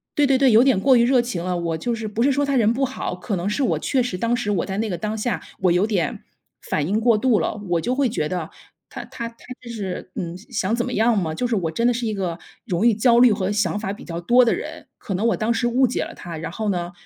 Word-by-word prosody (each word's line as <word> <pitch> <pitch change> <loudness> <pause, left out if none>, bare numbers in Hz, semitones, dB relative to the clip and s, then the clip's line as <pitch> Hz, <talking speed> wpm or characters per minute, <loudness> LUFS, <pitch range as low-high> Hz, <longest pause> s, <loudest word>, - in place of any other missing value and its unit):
对 290 -1 +3
对 270 -1 +4
对， 270 -2 +4
有 225 +2 +7
点 265 -6 +3
过 260 +2 +5
于 235 - +4
热 255 -1 +4
情 215 -8 -4
了， 180 -1 -1
我 170 -1 -2
就 235 +8 -2
是 225 -1 -6
不 210 +2 -3
是 280 - +4
说 285 +2 +1
他 275 -2 +1
人 225 0 +3
不 270 +2 -1
好， 260 -7 -4
可 185 +2 -3
能 180 +4 -2
是 240 +7 -1
我 - - +1
确 260 -3 +1
实 200 -7 -3
当 230 +4 0
时 225 -4 -2
我 195 - 0
在 195 0 -4
那 225 - -1
个 175 - -3
当 215 +5 -3
下 235 +3 -2 0.2
我 180 -2 +3
有 180 +5 +2
点 185 -8 -1 0.5
反 145 - 0
应 210 +3 +1
过 230 -1 +3
度 240 -2 +2
了， - - -1 0.2
我 170 -1 +2
就 250 +3 -1
会 270 -3 +2
觉 155 -9 -2
得 175 -3 -3 0.4
他 - - -8
他 235 0 -6
他 230 - -22 0.3
这 240 - -11
是， 190 -4 -5
嗯， 175 0 -4
想 215 -1 -2
怎 240 +1 -1
么 250 - -4
样 225 +1 +2
吗？ 160 -4 -1
就 245 +9 -1
是 235 - 0
我 165 -5 -1
真 235 +8 +1
的 245 - +3
是 240 0 -3
一 215 - -1
个 180 -4 -3 0.3
容 180 +6 0
易 235 - +6
焦 235 +2 +4
虑 245 -2 +7
和 190 -1 -1
想 205 -2 0
法 200 -2 -3
比 - - -11
较 170 -1 -5
多 245 +8 +4
的 230 - +2
人， - - -7
可 195 - -6
能 190 +5 -1
我 230 - +1
当 220 +2 0
时 240 +1 0
误 255 +2 +3
解 240 - -2
了 - - -8
他， 170 -2 -8
然 165 - -5
后 215 +4 -4
呢， 175 -2 -2
220 Hz, 315 characters per minute, -22 LUFS, 185-240 Hz, 0.5 s, 有